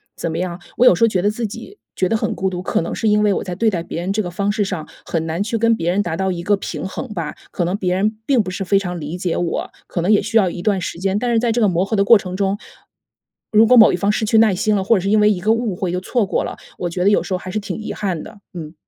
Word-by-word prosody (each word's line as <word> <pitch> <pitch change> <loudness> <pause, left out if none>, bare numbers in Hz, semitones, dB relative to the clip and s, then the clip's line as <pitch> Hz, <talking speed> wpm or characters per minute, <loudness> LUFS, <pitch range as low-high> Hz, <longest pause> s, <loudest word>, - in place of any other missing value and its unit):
怎 170 - -3
么 160 - -3
样， 175 0 -4 0.2
我 250 - +4
有 180 - +7
时 230 - 0
候 230 - +7
觉 185 -3 0
得 205 - +2
自 225 +2 -3
己 230 - -10 0.2
觉 185 - +1
得 225 - 0
很 220 0 -1
孤 190 0 -1
独， 180 -1 -4
可 - - 0
能 165 - -4
是 225 - -1
因 210 0 +3
为 205 -1 +3
我 - - -2
在 180 -2 -5
对 225 +4 +2
待 180 -5 -2
别 165 - -6
人 185 +3 -2
这 215 - 0
个 175 - -4
方 200 +3 -1
式 210 0 0
上， 185 -6 -4 0.2
很 165 -1 -2
难 165 +3 -2
去 225 +2 -1
跟 230 +1 +3
别 170 -5 -2
人 195 +3 +1
达 170 -3 -3
到 190 +2 -1
一 170 -1 -4
个 205 +3 +3
平 195 - -5
衡 215 +4 -6
吧。 160 -4 -4 0.2
可 175 - -1
能 180 +3 -1
别 180 -3 -1
人 210 +3 0
并 255 -6 +3
不 185 - -5
是 185 - -4
非 195 +1 +2
常 180 -3 -3
理 155 +3 -5
解 180 -2 -2
我， 175 -1 -2 0.2
可 175 - -3
能 185 +5 +1
也 210 - +5
需 220 +2 0
要 190 -4 +4
一 175 - -6
段 200 -1 +1
时 170 -1 -5
间， 195 +1 0
但 245 +2 -1
是 230 - +3
在 235 0 +1
这 240 - 0
个 210 - +4
磨 180 -1 +1
合 220 - -2
的 200 - +4
过 230 +3 +8
程 185 -2 -6
中， 200 0 0 0.9
如 220 0 +6
果 250 - +6
某 220 - +8
一 - - +2
方 200 +2 +1
失 220 - -1
去 220 +1 +2
耐 220 -2 +5
心 215 +2 +1
了， 195 - 0
或 230 +4 +3
者 - - -1
是 195 - -2
因 215 - +4
为 210 0 +5
一 195 - -1
个 215 +4 +2
误 230 -4 -1
会 180 0 -2
就 180 - -1
错 230 +3 0
过 190 - -1
了， - - -5 0.2
我 175 - -3
觉 180 +1 -2
得 200 - +5
有 205 - +3
时 190 - -4
候 - - +1
还 185 - -8
是 215 - -1
挺 200 - -5
遗 215 - -5
憾 185 -6 -3
的， 205 - -12
嗯。 160 -3 -7
195 Hz, 360 characters per minute, -19 LUFS, 180-215 Hz, 0.9 s, 过